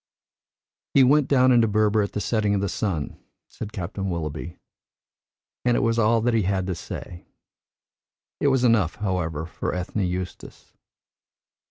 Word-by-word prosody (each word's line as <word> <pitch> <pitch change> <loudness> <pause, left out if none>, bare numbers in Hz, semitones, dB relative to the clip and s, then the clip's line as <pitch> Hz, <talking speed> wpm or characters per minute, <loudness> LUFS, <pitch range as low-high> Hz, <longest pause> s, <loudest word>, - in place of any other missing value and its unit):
"He 135 - +7
went 140 +2 +4
down 130 -2 +4
into 120 -2 +5
Berber 105 0 +2
at 100 - -3
the 105 - -2
setting 105 -2 +1
of 100 - 0
the 100 - 0
sun," 85 -9 -3 0.3
said 105 - -8
Captain 95 0 -4
Willoughby, 80 0 -4 1.1
and 120 -1 +2
it - - +1
was 115 -2 +1
all 115 +1 +3
that 120 +1 +1
he 115 - +3
had 95 -1 0
to 95 - -2
say. 85 0 -8 1.1
It - - +1
was 135 -2 +2
enough, 110 -9 +3
however, 85 -6 -2
for 85 - -4
Ethne 90 +4 -3
Eustace. 90 -1 -5
105 Hz, 155 wpm, -24 LUFS, 90-115 Hz, 1.1 s, He